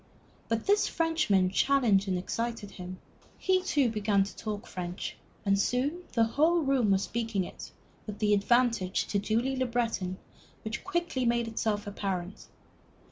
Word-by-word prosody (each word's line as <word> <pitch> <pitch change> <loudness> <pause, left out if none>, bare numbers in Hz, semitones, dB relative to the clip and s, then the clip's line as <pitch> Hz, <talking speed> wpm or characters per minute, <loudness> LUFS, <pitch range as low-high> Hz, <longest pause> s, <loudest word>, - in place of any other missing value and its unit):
But 230 -1 -1
this 410 0 +3
Frenchman 210 - +2
challenged 220 -4 +3
and 185 -1 0
excited 230 +2 -3
him. 185 0 -8 0.4
He, 370 -1 +2
too, 280 -9 +2
began 205 -2 +2
to 195 - -8
talk 210 -2 -5
French, 180 0 -5 0.3
and 200 0 +3
soon 285 - 0
the 230 - +4
whole 315 +9 +3
room 270 -6 +2
was 195 0 +3
talking 225 -4 -1
it, - - -9 0.4
with 210 -1 -6
an 210 0 +4
advantage 210 -2 +2
to 200 - 0
Julie 230 +6 0
Le 260 -1 0
Breton 230 -6 -1 0.5
which 220 0 -4
quickly 345 -7 -1
made 235 -1 +1
itself 220 -2 -1
apparent. 195 -2 -4
225 Hz, 150 wpm, -29 LUFS, 200-255 Hz, 0.5 s, the